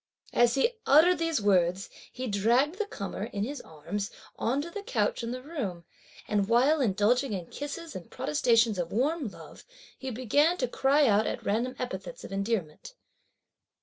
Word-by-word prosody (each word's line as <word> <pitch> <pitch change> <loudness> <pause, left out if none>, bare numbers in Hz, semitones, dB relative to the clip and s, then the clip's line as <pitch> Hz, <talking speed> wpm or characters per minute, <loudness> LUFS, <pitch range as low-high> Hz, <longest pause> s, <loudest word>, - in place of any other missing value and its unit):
As 240 0 +4
he 275 - +3 0.2
uttered 320 +4 +6
these 330 -3 +1
words, 185 -1 +2 0.2
he 255 - -5
dragged 245 - +2
the 430 - -1
comer, 200 - -5
in 205 -4 -3
his 280 +6 -4
arms, 195 +7 -5 0.3
on 255 +5 0
to 340 - -8
the 410 - -5
couch - - -1
in 230 - -4
the 255 +1 -5
room; 230 - -5 0.4
and 205 -2 +1
while 270 +6 +4
indulging 230 +3 +2
in 180 -3 -4
kisses 295 - -7
and 180 -2 -8
protestations 225 +6 +2
of 170 -1 -3
warm 285 +5 0
love, 200 - -12 0.3
he 265 - -6
began 285 +8 +2
to 250 - 0
cry 275 +4 +3
out 215 -2 +3
at - - -4
random 235 +5 0
epithets 195 -7 -6
of - - -9
endearment. 195 - -3
240 Hz, 170 wpm, -28 LUFS, 200-285 Hz, 0.4 s, uttered